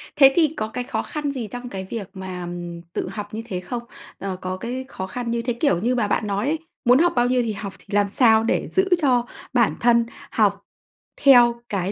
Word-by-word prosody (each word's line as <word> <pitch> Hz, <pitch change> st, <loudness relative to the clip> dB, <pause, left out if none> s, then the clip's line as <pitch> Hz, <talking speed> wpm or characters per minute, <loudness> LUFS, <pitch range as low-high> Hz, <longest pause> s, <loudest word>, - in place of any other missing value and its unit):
Thế 270 Hz, -1 st, +7 dB
thì 315 Hz, -3 st, +3 dB
có 215 Hz, -, -1 dB
cái 245 Hz, +3 st, -4 dB
khó -, -, -2 dB
khăn 295 Hz, -2 st, -3 dB
gì 250 Hz, -5 st, -4 dB
trong 245 Hz, +4 st, -7 dB
cái 190 Hz, -4 st, -5 dB
việc 210 Hz, -4 st, -5 dB
mà, 190 Hz, -1 st, -6 dB
ừm, 175 Hz, -1 st, -6 dB
tự -, -, -2 dB
học 205 Hz, +1 st, -7 dB
như 220 Hz, -, -3 dB
thế 185 Hz, -6 st, -4 dB
không? 235 Hz, +6 st, -5 dB, 0.4 s
Ờ, 195 Hz, -1 st, -3 dB
có 185 Hz, 0 st, -3 dB
cái 250 Hz, +6 st, -5 dB
khó 190 Hz, -8 st, -6 dB
khăn 235 Hz, +4 st, -4 dB
như 235 Hz, -, 0 dB
thế 245 Hz, 0 st, -1 dB
kiểu 235 Hz, -, +1 dB
như 245 Hz, +3 st, +1 dB
mà 235 Hz, -4 st, +1 dB
bạn 210 Hz, +1 st, 0 dB
nói 200 Hz, +2 st, -1 dB
ấy, 310 Hz, +2 st, 0 dB, 0.3 s
muốn 250 Hz, +3 st, +6 dB
học 345 Hz, 0 st, +3 dB
bao 240 Hz, -, +3 dB
nhiêu 250 Hz, 0 st, +2 dB
thì 225 Hz, -3 st, -2 dB
học, 200 Hz, -1 st, -6 dB
thì -, -, -21 dB
làm 205 Hz, 0 st, +3 dB
sao 225 Hz, -2 st, +4 dB
để -, -, 0 dB
giữ 380 Hz, +1 st, +2 dB
cho 250 Hz, -4 st, +3 dB, 0.3 s
bản 235 Hz, -3 st, +3 dB
thân 235 Hz, -1 st, +4 dB, 0.3 s
học -, -, +2 dB, 0.6 s
theo 240 Hz, -4 st, +6 dB
cái 195 Hz, -1 st, -1 dB
235 Hz, 235 wpm, -23 LUFS, 195-250 Hz, 0.6 s, Thế